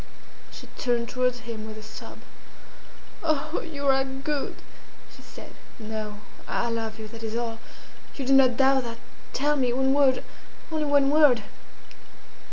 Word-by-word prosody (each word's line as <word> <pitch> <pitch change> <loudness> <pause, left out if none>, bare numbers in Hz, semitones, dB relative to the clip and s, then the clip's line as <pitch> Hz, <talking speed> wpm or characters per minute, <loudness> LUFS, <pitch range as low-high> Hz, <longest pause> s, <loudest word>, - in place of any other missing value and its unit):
She - - -10
turned 240 -2 0
towards 250 -1 0
him 225 -2 -6
with 215 0 -8
a 215 - -9
sob. 215 - -10 1.0
"Oh, 310 0 0
you 290 -4 -6
are 270 0 +5
good!" 270 +2 -3 0.6
she - - -14
said. - - -12 0.3
"No, 215 -2 -5 0.3
I 235 - 0
love 225 -1 -3
you, 220 -1 -7
that 230 +1 -10
is 220 0 -4
all! 230 -1 -2 0.6
You 275 - -4
do 270 - +4
not 260 -3 +6
doubt 270 -1 +4
that! 230 -1 -5 0.3
Tell 295 +2 +1
me 255 -4 +1
one 265 +1 +3
word 275 -2 +4 0.5
only 310 -1 0
one 285 -1 +4
word!" 290 -7 +5
255 Hz, 155 wpm, -26 LUFS, 230-280 Hz, 1.0 s, not